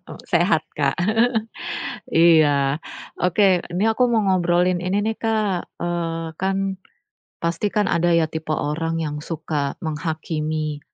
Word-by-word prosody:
Eee - - -9
sehat, 170 -3 +3
Kak. 140 -2 +1 1.2
Iya. 150 -4 +5 0.4
Oke. 180 0 +3
Ini 185 +4 0
aku - - +2
mau 225 - +4
ngobrolin 180 -1 +2
ini 190 +3 +1
nih, 220 +1 -1
Kak. 215 -5 0 0.2
Eee 165 -2 -3
kan, 195 +1 -1 0.6
pasti 170 +5 -1
kan 210 -2 +1
ada 170 0 +2
ya, 165 -2 +3
tipe 160 0 -4
orang 165 +2 -1
yang 150 -2 -3
suka 150 -3 -3
menghakimi 155 -1 -3
170 Hz, 125 wpm, -22 LUFS, 155-185 Hz, 1.2 s, Iya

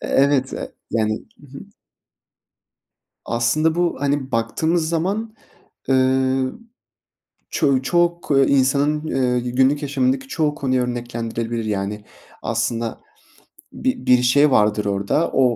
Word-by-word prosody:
evet, 135 -1 +2
e - - -6 0.2
yani, 110 -1 +1 0.3
ı 145 - -14
hı. 135 +1 -11 1.7
Aslında 155 +7 +1
bu, 175 0 0
hani 140 -1 -1
baktığımız 160 +9 0
zaman, 200 +7 -2 0.5
ııı, 130 - +1 0.9
çoğu 140 -5 +1
çok 175 +2 0 0.2
insanın 140 +3 +2 0.3
i 120 0 -4
günlük 135 +3 +3
yaşamındaki 135 -2 0
çoğu 150 +1 -1
konuyu 130 -3 0
örneklendirilebilir. 115 -1 -3
Yani, 105 0 -3 0.4
aslında 115 0 -2 0.7
bir 260 0 -2
bir 125 -1 +5
şey 140 +4 +4
vardır 105 -2 +2
orada, 100 +11 0
o - - +3
130 Hz, 110 wpm, -21 LUFS, 120-150 Hz, 1.7 s, bir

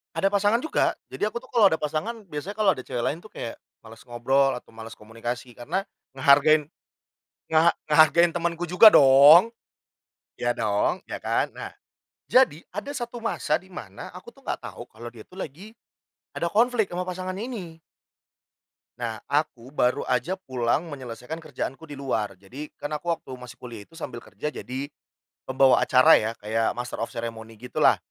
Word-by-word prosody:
Ada 195 - +2
pasangan 205 +3 +2
juga, 320 - +1 0.2
jadi - - -2
aku 235 - -4
tuh - - -17
kalau 230 -4 +4
ada 160 - -2
pasangan 155 +10 -2 0.2
biasanya 150 +7 -5
kalau 215 -2 +2
ada 130 - -8
cewek 120 - -3
lain 145 - -1
tuh 210 +4 -16
kayak 115 - -6 0.2
males 115 0 -13
ngobrol 135 +3 +1
atau 125 - -9
males 115 0 -10
komunikasi 120 +3 -7
karena 165 +11 -2 0.3
ngehargain, 145 +3 +4 0.8
ngeha 160 +1 +4 0.2
ngehargain 155 +3 +6
temanku 170 0 -3
juga 210 +5 +8
dong, 145 +9 +8 0.9
iya - - 0
dong, - - 0
iya - - -4
kan. - - 0
Nah - - -7 0.6
jadi 250 - +4
ada 210 +10 -6
satu 240 -3 -6
masa 155 -8 0
di 185 +2 -12
mana, 100 - -9
aku - - -12
tuh - - -15
nggak - - -3
tahu - - -9
kalau 120 +2 -9
dia 115 -2 -13
tuh 185 - -12
lagi 180 +9 -8 0.6
ada 170 - -2
konflik 225 +2 +2
sama 180 +1 -3
pasangan 185 +1 -5
ini 195 -7 -6 1.2
nah 115 -2 -3
aku 140 -3 -2
baru 125 0 +1
aja 130 +10 -1
pulang 130 0 -1
menyelesaikan 130 +3 -7
kerjaanku 150 0 -6
di 145 - -8
luar. 110 -8 -2
Jadi, 130 +11 -9
kan 145 +1 -5
aku 170 +3 -4
waktu 165 -5 -3
masih 125 -1 -10
kuliah 120 -4 -9
itu 165 - -16
sambil 120 -7 -7
kerja 150 +9 -6
jadi 130 +3 -5 0.6
pembawa 130 0 +4
acara 130 0 +5
ya, 110 - -1
kayak 110 +3 -1
master 120 0 -5
of 115 - -2
ceremony 115 -1 -7
gitu 125 +3 -6
lah, - - +6
145 Hz, 170 wpm, -25 LUFS, 120-180 Hz, 1.2 s, juga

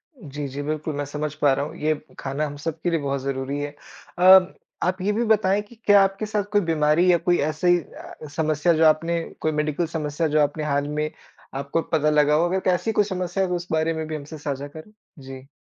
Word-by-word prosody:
जी, 145 - -7
जी। 140 +2 -6
बिल्कुल, 155 +1 -3
मैं 145 0 -2
समझ 150 +1 -4
पा 145 -2 +5
रहा 140 +2 -1
हूँ। - - -9
ये 155 +1 +1 0.3
खाना 140 +3 -2
हम 145 -1 -6
सबके 165 +3 -3
लिए 165 -2 0
बहुत 140 -1 -2
ज़रूरी 135 +1 -3
है। 145 0 -5 0.4
अ, 185 0 +7 0.3
आप 185 +1 -1
ये 205 +2 +1
भी 230 +3 0
बताएँ 210 -2 +2
कि 210 +3 -16
क्या 205 -1 +7
आपके 195 +2 -1
साथ 210 -1 -1
कोई 205 -1 +3
बीमारी 165 +2 +3
या 175 - +4
कोई 175 +1 +1
ऐसी 175 +3 +2
अ, 155 -1 -11
समस्या, 155 +1 +2
जो 160 0 +3
आपने 165 +2 +2 0.2
कोई 155 - +1
मेडिकल 150 +2 -1
समस्या, 150 +1 -1
जो 155 +1 +1
आपने 145 +1 0
हाल 145 -1 0
में 150 +1 -2 0.5
आपको 140 +4 -1
पता 155 -2 0
लगा 150 0 +3
हो? 165 +3 +3
अगर 190 0 0
ऐसी 180 +5 0
कोई 210 - +3
समस्या 185 -1 -2
है, 185 - -1
तो 180 - 0
उस 175 +1 -5
बारे 160 +1 +1
में 160 0 -4
भी 155 - -4
हमसे 150 +2 -8
साझा 140 -1 -4
करें। 155 +7 -12 0.3
जी। 130 0 -10
155 Hz, 225 wpm, -23 LUFS, 145-180 Hz, 0.5 s, अ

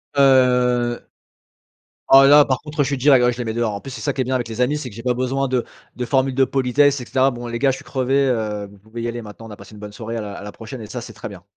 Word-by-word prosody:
Heu, 125 -3 +3 1.1
ah 135 0 +8
là, 145 +1 +7
par 130 - -1
contre 150 -1 -2
je - - -2
suis 140 - -1
direct, 130 -1 +4
ouais, 125 - +3
je 120 - -10
les 120 - -3
mets 110 - -3
dehors. 115 -2 -1
En 100 - -6
plus 135 - -9
c'est 120 -3 -8
ça - - -1
qui 135 - -4
est - - +1
bien 130 +1 -2
avec 120 -2 -3
les 115 +2 -6
amis, 145 +4 +1
c'est 130 - -6
que 100 - -13
j'ai 115 - -9
pas 125 -1 0
besoin 130 +2 -1
de 125 -2 0 0.3
de 125 - -3
formule 135 0 +1
de 135 0 +4
politesse, 140 +1 +2
et - - -6
cetera. 130 +2 +2
«Bon, 120 0 -7
les 120 0 -4
gars 135 +2 +3
je 130 - -2
suis 135 - -13
crevé, 135 +1 0
heu, 105 -4 -2
vous 100 - -17
pouvez 110 +3 -9
y 120 - -2
aller 120 0 -4
maintenant, 110 +1 -11
on - - -12
a 105 - -9
passé - - -14
une 105 - -12
bonne 105 -1 -8
soirée 115 +2 -6
à - - -2
la 105 -1 -6
à - - -9
la 105 - -8
prochaine», 115 +2 -9
et - - -8
ça 120 +3 -6
c'est 115 -1 -10
très 110 - -8
bien. 95 -3 -12
125 Hz, 325 wpm, -20 LUFS, 115-135 Hz, 1.1 s, ah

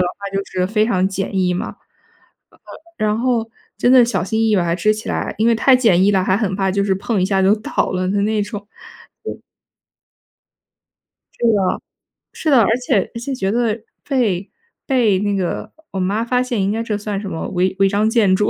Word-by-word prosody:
的 180 - +2
话 200 +2 -7
就 195 - 0
是 185 -1 -1
非 215 +2 +1
常 190 -5 +1
简 195 0 -3
易 180 -1 +2
嘛。 180 - -2
呃 - - -7 1.3
呃， 215 - +1
然 210 +1 +1
后 235 -2 0 0.3
真 245 - +3
的 250 -2 +7
小 230 -6 -1
心 220 +4 -2
翼 225 0 +2
翼 210 - +4
把 180 - +2
它 170 0 0
支 215 +3 +2
起 215 - -7
来， - - -2
因 225 +2 +2
为 235 - +5
太 260 +4 +5
简 220 -8 +3
易 195 - +4
了， 190 -2 +2
还 190 +1 +2
很 195 -4 -1
怕 195 -1 0
就 200 +1 0
是 190 - +1
碰 195 +1 -1
一 - - +2
下 195 0 +1
就 195 +2 +5
倒 215 - -2
了 185 0 -1
的 200 +2 0
那 215 0 +1
种， 205 -1 -7 0.6
对。 - - -6 2.0
是 235 - +2
的， 195 -3 +1 0.5
是 315 - -2
的， 255 -4 +6
而 - - +3
且 245 -6 0
而 - - -4
且 265 +3 -4
觉 195 -4 -1
得 230 -1 0 0.3
被 215 -9 0 0.4
被 235 -8 +2
那 205 0 0
个 185 -3 -3 0.2
我 190 - -4
妈 200 +5 0
发 250 +1 +1
现 245 -5 -1
应 195 +1 +1
该 225 +1 -1
这 215 -3 -2
算 205 -1 -4
什 195 -1 -6
么， 160 - -4
违 185 0 0
违 195 - +4
章 210 +2 +1
建 210 -5 +3
筑？ 210 +1 +1
205 Hz, 240 characters per minute, -19 LUFS, 190-225 Hz, 2.0 s, 的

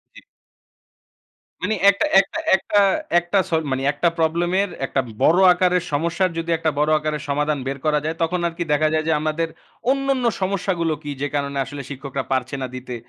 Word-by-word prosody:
জি। - - -11 1.4
মানে 220 - 0
একটা 200 - +2
একটা 260 - -1 0.2
একটা 205 +2 +1 0.4
একটা 175 +3 0
স - - -16 0.2
মানে 130 0 -1
একটা 170 +4 +1
প্রবলেম 170 +2 +1
এর 200 - -1 0.2
একটা 135 0 0 0.2
বড় 175 +4 +5
আকারের 180 -1 +1
সমস্যার 170 +5 0
যদি 165 0 -3
একটা 160 -1 0
বড় 150 +1 +2
আকারের 150 -1 -3
সমাধান 150 0 0
বের 135 - -3
করা 150 -1 +2
যায় 160 +1 -2
তখন 180 +2 0
আরকি 170 +1 -4
দেখা 155 +1 +3
যায় 155 0 0
যে, - - +2
আমাদের 155 +1 -1 0.4
অন্যান্য 275 -2 0 0.2
সমস্যাগুলো 185 -4 0
কি 145 - -5
যে, 145 - 0
কারণে 140 -1 -2
আসলে 145 -1 -7
শিক্ষকরা 135 -1 -5
পারছে 130 +1 -1
না 130 - -2
দিতে 125 -1 -6
160 Hz, 180 wpm, -21 LUFS, 145-180 Hz, 1.4 s, বড়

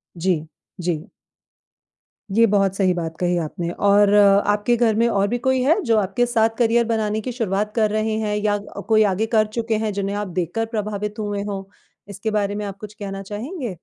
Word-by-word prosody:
जी, 165 -2 -1 0.3
जी। 170 +1 -2 1.3
ये 230 0 +6
बहुत 195 -1 +2
सही 185 -2 +2
बात 165 -2 -4
कही 180 -1 +1
आपने 170 +2 -4 0.2
और 205 0 +5
आपके 205 +3 +4
घर 225 -2 +2
में 230 +1 +3
और 200 -3 +1
भी 245 - -1
कोई 260 +1 +1
है? 320 +9 +3
जो 230 -4 +2
आपके 205 +4 +1
साथ 225 -2 +2
करियर 235 0 +3
बनाने 220 -1 -1
की 250 - -4
शुरुआत 210 -3 -2
कर 215 -2 +3
रहे 215 0 0
हैं 210 -1 -1
या 205 0 +1
क 200 - -9
कोई 215 -1 +5
आगे 220 +4 0
कर 215 -1 +4
चुके 225 -1 0
हैं 215 - 0
जिन्हें 200 0 -2
आप 205 -1 -3
देखकर 180 +5 -2
प्रभावित 210 0 -3
हुए 205 -1 -2
हों। 200 -2 -4 0.5
इसके 200 +3 -4
बारे 205 -1 0
में 210 0 -3
आप 195 -1 -6
कुछ 210 -1 -9
कहना 195 -2 -6
चाहेंगे? 230 - -5
210 Hz, 200 wpm, -21 LUFS, 195-225 Hz, 1.3 s, ये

